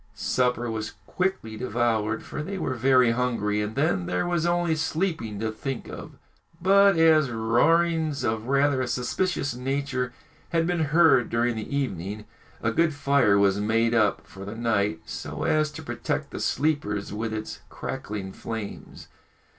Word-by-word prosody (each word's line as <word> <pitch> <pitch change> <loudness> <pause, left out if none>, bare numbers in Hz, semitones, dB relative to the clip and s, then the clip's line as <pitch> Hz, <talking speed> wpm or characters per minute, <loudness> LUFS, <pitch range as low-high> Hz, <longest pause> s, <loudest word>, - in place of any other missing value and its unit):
Supper 120 +3 0
was 110 0 -4
quickly 180 - -2
devoured, 110 -2 0
for - - -6
they 195 +6 -4
were 145 - -2
very 130 -1 +4
hungry, 115 -4 0
and 105 +1 -4
then 100 - +1
there 90 - 0
was 175 -1 0
only 175 -1 +1
sleeping 160 - -2
to 110 0 -1
think 130 +3 -5
of. - - -8 0.5
But, 195 +1 +5
as 160 -4 +5
roarings 155 +7 +2
of 110 +1 -1
rather 140 0 +2
a 130 - -1
suspicious 140 +4 -1
nature 130 0 -2 0.4
had 165 -1 +1
been 170 -2 +1
heard 150 -5 +4
during 120 +1 +1
the 110 +5 -4
evening, 105 -5 -3 0.4
a - - +2
good 165 -3 +2
fire 140 -8 +3
was 100 0 +3
made 115 +2 +2
up 110 -3 +2
for 95 - -11
the 100 +3 -6
night, 105 -7 0
so - - -6
as 155 0 +2
to - - -8
protect - - -3
the - - -5
sleepers 105 -11 -1
with 110 +1 -3
its 110 0 -5
crackling 100 -2 -5
flames. 110 -3 -7
125 Hz, 155 wpm, -26 LUFS, 110-155 Hz, 0.5 s, But